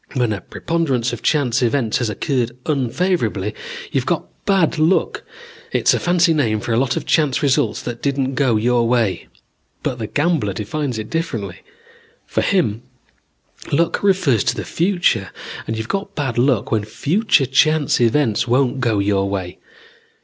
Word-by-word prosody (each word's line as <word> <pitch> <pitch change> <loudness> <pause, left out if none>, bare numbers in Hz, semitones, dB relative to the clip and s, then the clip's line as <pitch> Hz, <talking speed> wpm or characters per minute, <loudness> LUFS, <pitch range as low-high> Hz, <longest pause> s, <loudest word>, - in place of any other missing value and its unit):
When 120 -4 +1
a 100 - -5
preponderance 135 - -1
of 120 - -6
chance 130 -5 +1
events 120 -2 +1
has 120 -3 -1
occurred 120 +2 -2
unfavorably, 155 +6 0 0.4
you've - - -1
got - - 0 0.2
bad 185 -5 +2
luck. 160 +5 +2 0.5
It's - - +3
a - - +1
fancy 175 -1 +3
name 115 -9 +1
for 115 - -3
a - - +2
lot 130 0 +1
of - - -4
chance 150 -5 +1
results 140 -2 +1
that 120 -1 -5
didn't 135 -1 -1
go 130 -4 +2
your 120 +2 +2
way. 115 -5 0 0.6
But 125 - -2
the 110 - -3
gambler 145 - 0
defines 125 +5 -3
it 110 -1 -6
differently. 110 - -3 0.7
For - - -1
him, 140 - +1 0.9
luck 165 +4 +1
refers 180 - +2
to - - +1
the - - -5
future, 175 +1 +1 0.4
and 110 - -2
you've 110 0 -4
got 195 +4 -3
bad 135 -6 -2
luck 125 -4 +1
when 110 -2 +1
future 155 - +1
chance 150 +1 +2
events 120 -1 +2
won't 130 +2 +2
go 115 -4 +1
your 100 -1 +1
way. 95 -3 -4
130 Hz, 160 wpm, -19 LUFS, 115-155 Hz, 0.9 s, It's